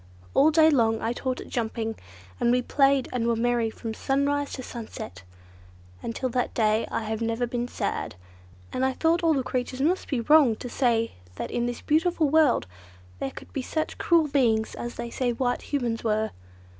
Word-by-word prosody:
All 285 +3 +6
day 315 0 +5
long 225 -5 +3
I 225 +2 -1
taught 255 +1 -3
it - - -10
jumping, 225 -1 -2 0.5
and - - +2
we 250 0 +2
played 275 0 +3
and 235 -2 0
were 235 - +2
merry 235 0 +1
from 220 0 -6
sunrise 280 +3 0
to 255 - -5
sunset. 220 - -8 0.8
Until 235 +3 -3
that 250 +1 -1
day 215 -1 +2
I - - -2
had 220 +1 -3
never 230 +1 0
been 240 0 -2
sad, 80 - -3 0.6
and 255 - -1
I 265 0 +2
thought 330 +5 +2
all 325 -2 +3
the 265 - 0
creatures 255 0 -3
must 335 +7 +1
be 265 - 0
wrong 285 -3 +5
to 245 - -7
say 230 -3 +1 0.2
that - - -5
in 240 0 0
this 245 - -4
beautiful 320 -1 +2
world 310 - +4 0.5
there 135 - -2
could - - -12
be 270 - -2
such 310 +4 -3
cruel 335 -3 +3
beings 235 -6 +2
as 240 0 -6
they 235 0 -5
said 245 -2 -1
White 245 -2 0
Humans 240 -5 -2
were. 220 -1 0
245 Hz, 190 wpm, -26 LUFS, 230-280 Hz, 0.8 s, All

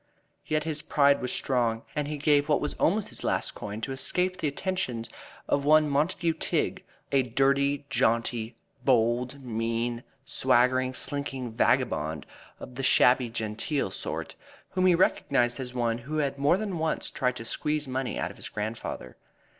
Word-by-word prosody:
Yet 155 0 +1
his 155 -2 -2
pride 140 -1 +3
was 125 - -2
strong, 115 -3 0
and 150 -1 -1
he 150 0 -3
gave 145 0 +3
what 150 - +4
was 150 - -2
almost 205 +4 +2
his - - -7
last - - 0
coin 105 +1 -6
to 135 - -3
escape 180 +7 0
the 160 - -1
attentions 140 -7 -2 0.4
of 140 - +1
one 155 +1 +5
Montague 160 +4 +1
Tigg, - - -1 0.3
a 135 -1 +4
dirty, 140 +3 +1
jaunty, 115 -2 +1 0.3
bold, 125 +2 +1
mean, 115 0 -2 0.2
swaggering, 130 -1 +2
slinking 135 -4 -3
vagabond 110 - +1 0.3
of 125 - -9
the 130 - -5
shabby 125 -1 +4
genteel 110 +2 -2
sort, - - -5 0.4
whom 185 0 +2
he 180 - +6
recognized 125 -7 +2
as 125 -1 -6
one 120 -1 0
who 145 +6 -5
had 140 -2 -1
more 145 +6 +4
than 195 -5 -3
once 160 0 -1
tried 125 -1 0
to 115 - -7
squeeze 150 +3 -2
money 130 0 -2
out - - -2
of - - -15
his - - -7
grandfather. 105 - -5
130 Hz, 160 wpm, -28 LUFS, 120-150 Hz, 0.4 s, he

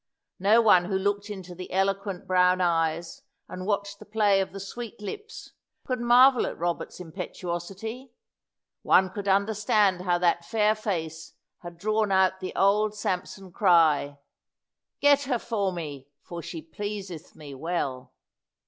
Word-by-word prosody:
No 210 +5 +5
one 185 -5 +5
who 190 +1 -1
looked 200 +2 -1
into 190 -3 -7
the 180 +1 -9
eloquent 195 0 -1
brown 180 0 +3
eyes, 165 -1 0 0.3
and 185 +1 -7
watched 200 -1 -2
the - - -12
play 205 -2 +2
of 190 - -4
the 195 - -8
sweet 230 +4 -8
lips, 420 - -8 0.3
could 255 -2 -2
marvel 245 +2 +5
at - - -6
Robert's 175 +1 -3
impetuosity. 180 +7 -6 0.7
One 185 0 +4
could 200 +1 -6
understand 200 -1 +2
how 180 -1 +1
that 175 -1 +1
fair 215 +2 +2
face 165 -7 -4 0.3
had 175 -1 -10
drawn 215 +2 0
out 190 0 +3
the 185 - -6
old 210 +2 +2
Samson 185 -1 -4
cry, 160 -7 +3 0.8
"Get 285 0 +4
her 255 -2 0
for 210 -5 -2
me, 145 -6 -7 0.2
for 170 -1 -7
she 160 0 -7
pleaseth 190 0 -7
me 145 -2 -10
well." 135 -3 -3
190 Hz, 145 wpm, -26 LUFS, 175-210 Hz, 0.8 s, No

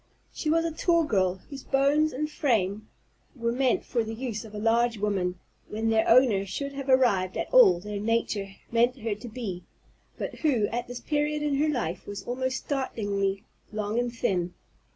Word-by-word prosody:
She 310 - -3
was 330 +1 +3
a 330 - -1
tall 335 +1 +2
girl, 190 - +1
whose 275 -2 -7
bones 285 +3 +2
and 295 +4 -2
frame 215 - 0 0.5
were 235 -2 -1
meant 255 0 +1
for 235 -2 0
the 220 0 -5
use 230 -2 -4
of 215 -1 -11
a - - -4
large 230 +2 +2
woman, 195 -3 -1 0.3
when 225 +1 -1
their 220 0 +2
owner 230 -5 +5
should 280 +9 -4
have 275 0 -6
arrived 205 -9 +3
at - - -4
all - - +7
that 210 +1 -5
nature 215 -2 0 0.2
meant 240 +3 +3
her 225 -1 -1
to 210 +4 -9
be, 210 -7 -5 0.5
but - - -5
who 260 -9 +2
at 240 +1 -3
this 245 0 -7
period 295 0 0
of 295 -2 +1
her 300 +3 +2
life 225 - -2
was 200 -1 -6
almost 260 +1 -2
startlingly 205 -8 -2 0.3
long 215 +1 -1
and 245 0 -1
thin. 180 -5 -1
230 Hz, 185 wpm, -27 LUFS, 205-270 Hz, 0.5 s, all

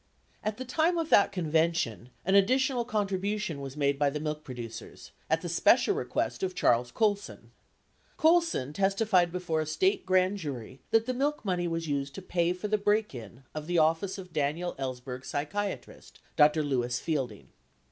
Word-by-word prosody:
At 215 0 -2
the 260 - -5
time 320 +7 +1
of 325 -1 -2
that 200 0 +6
convention, 160 - 0 0.2
an 190 - +1
additional 250 +5 +3
contribution 205 - -2
was 135 +1 -7
made 140 -1 +1
by 145 -1 +3
the 150 +2 -4
milk 150 0 -4
producers 120 -4 -9
— - - -36
at - - +2
the - - -5
special - - +4
request - - -2
of 185 -1 -2
Charles 120 -4 +2
Colson. 205 - -1 0.7
Colson 325 - +2
testified 195 -1 +2
before 175 -3 -1
a 155 - -4
State 380 - +1
grand 185 +1 +3
jury 135 - -6
that 225 0 +3
the 255 - -1
milk 280 0 -1
money 180 -2 0
was 165 -1 -3
used 140 -1 -2
to 195 - -6
pay 175 -1 +1
for 180 +3 -4
the 215 0 +1
break 210 -1 +1
in 120 +1 -10
of 155 0 -6
the 175 0 0
office 165 +5 +2
of 180 -3 -10
Daniel 155 +4 -1
Ellsberg's 130 -1 -5
psychia 185 +3 -2
trist, - - -17 0.2
Dr. 150 +1 +5
Lewis 125 -3 -1
Fielding. 130 -10 -3
175 Hz, 180 wpm, -29 LUFS, 140-205 Hz, 0.7 s, that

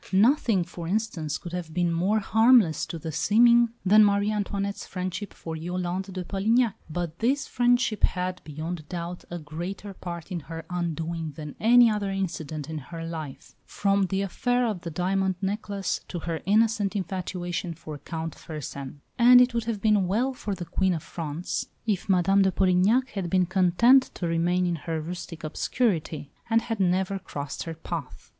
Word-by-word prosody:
Nothing, 215 - +4
for 170 -1 -8
instance, 180 -7 -1
could 175 - -9
have 170 -3 -5
been 175 -1 +1
more 185 +6 +2
harmless 220 -5 +4
to 170 - -5
the 160 0 -5
seeming 235 +8 +5 0.2
than 210 +3 +7
Marie 205 0 +3
Antoinette's 200 -1 -2
friendship 185 +2 -4
for 165 -1 -7
Yolande 180 +3 -3
de 185 -1 -4
Polignac; 220 +5 +2 0.2
but 170 +1 -4
this 270 +5 +1
friendship 245 -2 +2
had, 180 0 0
beyond 155 +1 -6
doubt, 175 0 -5
a 175 - -4
greater 175 +6 -6
part 170 -1 -7
in 175 - -2
her 165 +1 -8
undoing 165 -2 -3
than 150 0 -7
any 240 +2 +7
other 210 -2 0
incident 160 -6 -3
in 160 -1 -4
her 165 +4 -7
life, 160 -5 -7
from 200 -1 +1
the 195 +1 -1
affair 245 +6 0
of 210 -6 -2
the 170 - -5
"diamond 190 +3 0
necklace" 200 0 -2
to 180 - -5
her 165 -1 -3
innocent 215 -1 +2
infatuation 180 -2 -3
for 150 -1 -8
Count 160 +2 -5
Fersen; 140 -3 -7 0.2
and 245 +1 +9
it 250 0 +4
would 235 -1 -1
have 220 -3 -3
been 210 -4 +3
well 240 +8 +1
for 210 -5 -4
the 175 - -6
Queen 185 +2 +1
of 160 - -5
France 165 0 -4 0.2
if 205 -3 -1
Madame 195 +1 +4
de 190 -1 +3
Polignac 195 +8 +3
had 190 -4 -4
been 185 +1 +3
content 190 +8 +4
to 175 - -3
remain 175 +2 +1
in 175 -1 0
her 160 +1 -3
rustic 165 0 -7
obscurity, 155 - -1 0.2
and 225 0 +3
had 225 -3 -3
never 190 +1 +1
crossed 145 -5 -6
her 165 -1 -5
path. 160 -4 -7
185 Hz, 175 wpm, -26 LUFS, 165-205 Hz, 0.2 s, and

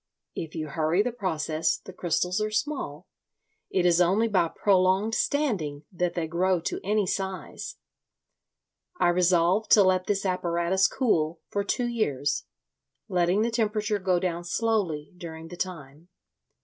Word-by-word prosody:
If 160 0 -6
you 155 -1 -4
hurry 160 +6 +1
the 245 - -1
process 160 -8 -1
the 190 - -12
crystals 180 +2 0
are 215 - 0
small—it 215 -6 -4
is 175 0 +4
only 195 +6 +3
by 185 -6 +2
prolonged 190 +4 +2
standing 205 - 0
that 180 -1 -1
they 170 -2 -1
grow 180 +3 +1
to - - -3
any 210 +1 +1
size. 190 0 -4 1.2
I - - +4
resolved 180 +3 +3
to 205 - +8
let 185 -1 +2
this 200 -1 0
apparatus 180 0 +1
cool 165 - 0
for 200 - -1
two 245 +4 -1
years, 145 - -1 0.6
letting 180 +2 +2
the 235 - 0
temperature 215 -2 0
go 185 -1 +1
down 175 -1 -2
slowly 175 -6 -1
during 165 -2 -8
the 175 - -8
time. 160 -4 -6
185 Hz, 140 wpm, -27 LUFS, 170-205 Hz, 1.2 s, to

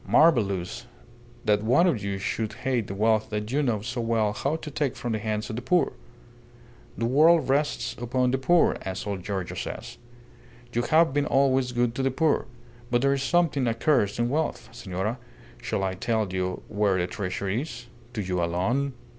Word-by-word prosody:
"Marvellous! 100 - +2 0.6
that 105 -1 +3
one 125 +11 +4
of 130 - +1
you 100 -1 -2
should 110 +2 -2
hate 125 -5 -1
the 100 - -5
wealth 110 +1 +2
that 105 +1 -3
you 145 +3 +2
know 120 -7 0
so 120 +1 -3
well 115 -2 +1
how 140 +8 -1
to 155 -2 -7
take 140 -2 -1
from 120 -1 -4
the 110 - -1
hands 105 0 -2
of - - -4
the - - -3
poor. 175 +8 +2 1.0
The 115 - 0
world 155 +7 +5
rests 145 +2 0
upon 125 +1 +1
the 135 - 0
poor, 175 +5 +3
as 95 0 -5
old 100 -3 -3
Giorgio 95 -3 -3
says. - - -6 0.7
You 120 - +1
have 155 +3 +3
been 145 0 +1
always 135 -2 +2
good 120 -1 +1
to 135 - -2
the 135 - +2
poor. 150 +2 +1 0.4
But 120 +1 +1
there 140 0 +4
is 140 - -1
something 145 -3 +2
accursed 115 -2 +1
in 120 0 +1
wealth. 155 +5 -2
Senora, 110 0 -4 0.4
shall 95 - -2
I 95 -1 0
tell 110 -1 -1
you 90 0 -2
where 100 -2 +1
the 90 - +1
treasure 100 +1 -4
is? 120 +4 -3 0.3
To 110 -4 -2
you 90 -2 -1
alone. 115 +12 0
120 Hz, 190 wpm, -26 LUFS, 105-135 Hz, 1.0 s, world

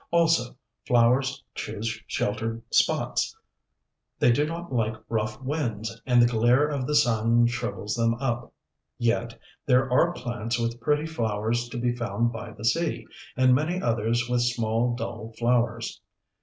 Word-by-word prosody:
Also, 165 -8 +2 0.3
flowers 130 +3 +3
choose 110 +1 -4
sheltered 115 +2 -2
spots. - - +1 0.8
They - - +4
do 145 +5 +2
not 170 -2 -6
like 110 -2 0
rough 110 -1 -2
winds, 115 -6 -3
and 125 -1 +4
the 120 - +7
glare 120 +4 +3
of 140 -4 -2
the 150 - 0
sun 120 -3 +4
shrivels 120 -3 -2
them 115 -1 +1
up. 120 -2 -3 0.5
Yet 120 -1 0 0.3
there 130 0 +4
are 170 +6 +4
plants 120 -4 -3
with 115 0 -2
pretty 150 +5 +1
flowers 115 -4 -1
to 120 - -6
be 120 0 0
found 120 0 -1
by 115 - -7
the 110 - -8
sea, 165 +7 0 0.3
and 130 0 +5
many 155 +7 +1
others 115 - 0
with 125 0 +1
small, 120 0 0
dull 115 -2 -6
flowers. 120 -1 0
120 Hz, 145 wpm, -26 LUFS, 115-130 Hz, 0.8 s, the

